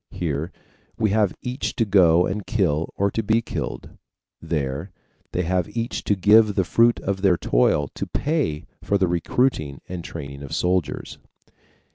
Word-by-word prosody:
Here 80 0 -3 0.5
we 110 -2 +1
have 105 -3 +2
each 125 +1 -3
to 115 - +1
go 90 -4 +5
and 100 +2 -4
kill 85 -9 0
or 100 0 +1
be 110 +1 +1
killed, 70 - -6 0.4
there 75 +3 -3 0.4
they 90 - -1
have 90 +4 -1
each 115 +1 -2
to 105 - +2
give 105 +2 +5
the 95 - +2
fruit 115 +6 +3
of 95 -1 -2
their 95 -3 +4
toil 70 +2 +2
to - - -6
pay 145 - -1 0.2
for 100 - +1
the 95 -2 +2
recruiting 85 - 0
and 90 -2 -6
training 70 -4 -8
of 70 - -5
soldiers. 90 -3 -1
95 Hz, 155 wpm, -23 LUFS, 80-105 Hz, 0.5 s, go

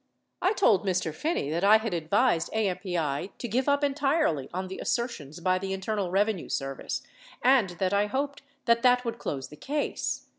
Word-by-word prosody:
I 375 +4 +3
told 225 - +4
Mr. 185 -5 0
Phinney 160 - -1
that 170 +3 -1
I 210 +2 +8
had 220 -3 -3
advised 170 +2 +2
AMPI 180 -6 -1
to 240 - -4
give 250 +5 0
up 285 +1 +2
entirely 280 - +1
on 185 +2 -3
the 190 - -7
assertions 175 - -3
by 185 +1 +1
the 195 0 -3
Internal 195 0 -2
Revenue 200 0 0
Service 135 -1 -3 0.4
and 250 -6 +5
that 190 +1 0
I 205 +1 +3
hoped 280 +5 -2 0.2
that, 235 -1 +4
that 250 0 +4
Avould 235 -2 -4
close 135 -2 -4
the 150 - -12
case. 290 - -2
200 Hz, 180 wpm, -28 LUFS, 175-250 Hz, 0.4 s, I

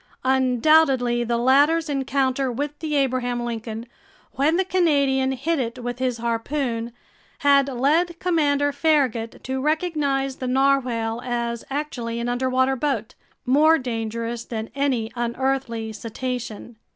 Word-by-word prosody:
Undoubtedly 260 -1 +3
the 235 0 0
latter's 290 +7 +3
encounter 270 -2 0
with 290 +4 -4
the 310 -2 -2
Abraham 245 -3 0
Lincoln, 225 -1 -5 0.5
when 305 +5 +1
the 380 - +1
Canadian 280 -8 +2
hit 295 +5 -1
it 235 -2 -3
with 245 +1 -4
his 255 -2 0
harpoon, 235 0 -2 0.5
had 280 -1 +5
led 310 +7 +1
Commander 290 -5 +2
Farragut 275 -7 0
to 265 +1 -3
recognize 295 -4 0
the 255 - -4
narwhale 250 -4 +1
as 235 -1 -2
actually 250 -5 -3
an 235 +1 -2
underwater 260 +2 +1
boat, 255 -4 -2 0.3
more 305 +5 +5
dangerous 230 -2 -4
than 225 -1 -5
any 260 -5 0
unearthly 240 -2 -2
cetacean! 235 0 -5
260 Hz, 125 wpm, -23 LUFS, 235-285 Hz, 0.5 s, had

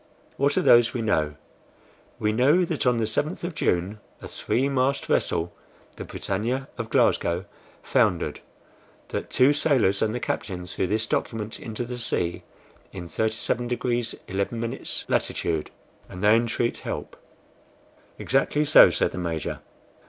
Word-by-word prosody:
"What 140 +1 +1
are - - +3
those 120 0 +5
we 120 - -1
know? 75 -8 +1 0.8
We 105 0 0
know 140 +11 +4
that 160 -6 -2
on 125 -1 +3
the 115 - +1
7th 150 - -2
of 175 0 -3
June 95 - 0 0.2
a - - -8
three 130 +3 -1
mast 135 0 0
vessel, 85 +1 0 0.4
the - - -7
BRITANNIA 120 +7 -2
of 115 -1 -5
Glasgow, 85 -4 +2 0.4
foundered; - - +1 0.7
that - - -4
two 130 +3 +4
sailors 130 -10 +2
and 110 +1 +1
the - - -2
captain 90 -6 -3
threw 90 - -2
this 110 +3 0
document 110 0 -3
into 110 +1 -5
the 120 0 -6
sea 85 -7 -1 0.5
in 90 -3 -7
37 110 +4 -1
degrees 120 -1 -1
11" 115 +5 -3 0.2
latitude, 80 -2 -1 0.4
and 90 +2 -8
they 105 +2 +6
entreat 115 0 0
help." - - -5 1.0
"Exactly 135 +3 +1
so," 150 - +8
said - - 0
the - - -5
Major. 85 -4 -3
115 Hz, 145 wpm, -25 LUFS, 95-130 Hz, 1.0 s, so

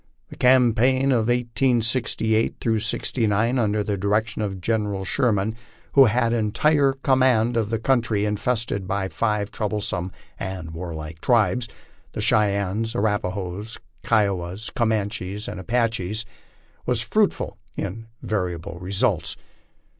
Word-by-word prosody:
The - - -10
campaign 130 +1 +4
of 115 -3 +2
1868 120 -2 +1 0.2
'69, 115 +2 0
under 105 -2 +1
the 100 -1 -2
direction 105 +3 0
of 100 -3 -3
General 105 -1 -1
Sheridan, 105 0 +1 0.4
who 135 -1 +7
had 115 +1 +2
entire 135 +6 +2
command 130 -4 +2
of 110 -3 0
the 115 - 0
country 115 -3 +1
infested 105 -2 -1
by 95 0 -1
the - - -20
five 105 -2 0
troublesome 100 -4 -2 0.3
and 95 -4 -5
warlike 80 -1 -7
tribes, 115 0 +2 0.5
the - - -3
Cheyennes, 105 +2 +1
Arapahoes, 105 -1 -2 0.2
Kiowas, 100 -2 0
Comanches, 105 -3 -1
and - - -5
Apaches, 115 -1 -1 0.6
was - - +1
fruitful - - 0 0.2
in 110 +4 -4 0.2
valuable 90 -4 -3
results. 90 -3 -1
110 Hz, 115 wpm, -23 LUFS, 100-115 Hz, 0.6 s, who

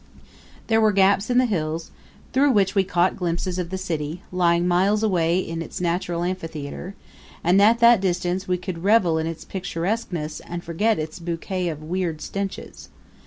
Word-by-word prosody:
There 225 -1 +3
were 215 -1 +4
gaps 195 +2 +3
in 245 - +2
the 255 - +5
hills, 165 -6 -2 0.4
through 275 +1 +4
which 195 -3 +2
we 195 - +3
caught 180 0 +1
glimpses 180 +1 -2
of 175 -2 -3
the 190 - -3
city, 165 -1 -4
lying 175 -1 +2
miles 195 +5 +2
away 175 -5 +2
in 165 -3 -3
its - - -6
natural 175 0 -1
amphitheater; 170 0 -5 0.5
and 180 +4 +4
at 220 +3 +6
that 235 -3 +7
distance 180 0 -1
we 180 0 +1
could 180 -2 -6
revel 190 -6 +4
in 160 - -2
its 165 -1 -6
picturesqueness 180 -3 -3
and 175 0 -7
forget 205 +7 +1
its 155 +3 -5
bouquet 175 +2 -3
of 155 -2 -4
weird 170 -1 -2
stenches. 195 +4 -6
180 Hz, 170 wpm, -23 LUFS, 165-195 Hz, 0.5 s, that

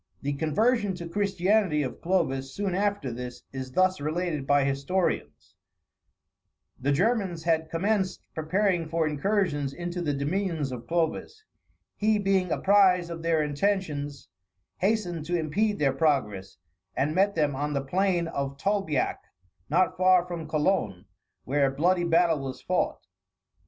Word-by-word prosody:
] - - -42
The 145 +1 -1
conversion 200 - +1
to 170 -1 -7
Christianity 195 -3 +1
of 130 - -6
Clovis, 135 -7 -1
soon 200 -2 -1
after 200 -8 0
this, 125 +1 -7
is 130 -1 -6
thus 185 -1 +2
related 155 -2 -2
by 145 -1 +4
historians: 140 +7 -2 1.3
The 140 +3 0
Germans 185 0 0
had 160 -1 +1
commenced 190 +2 -1
preparing 175 +1 0
for 165 -1 +1
incursions 150 -3 0
into 175 0 -4
the 150 -4 -1
dominions 155 0 -1
of 120 -2 -7
Clovis; 175 - -2 0.5
he, 215 0 +2
being 195 -3 +1
apprised 185 -3 +4
of 165 -1 -6
their 165 -2 +2
intentions, 145 -3 -2 0.5
hastened 180 -6 0
to 175 +2 0
impede 205 +7 0
their 140 -2 +2
progress, 105 -11 0 0.4
and 145 +3 +1
met 195 +3 +2
them 150 -4 +1
on 145 +2 -2
the 140 -1 -2
plains 180 +1 +1
of 140 0 -3
Tolbiac, 195 -5 0 0.5
not 180 +5 +2
far 185 -1 +5
from 170 -3 -6
Cologne, 150 - 0 0.4
where 140 +1 +2
a - - -1
bloody 175 +5 +2
battle 165 -2 +3
was 135 -1 -6
fought. - - -1
165 Hz, 140 wpm, -27 LUFS, 145-190 Hz, 1.3 s, far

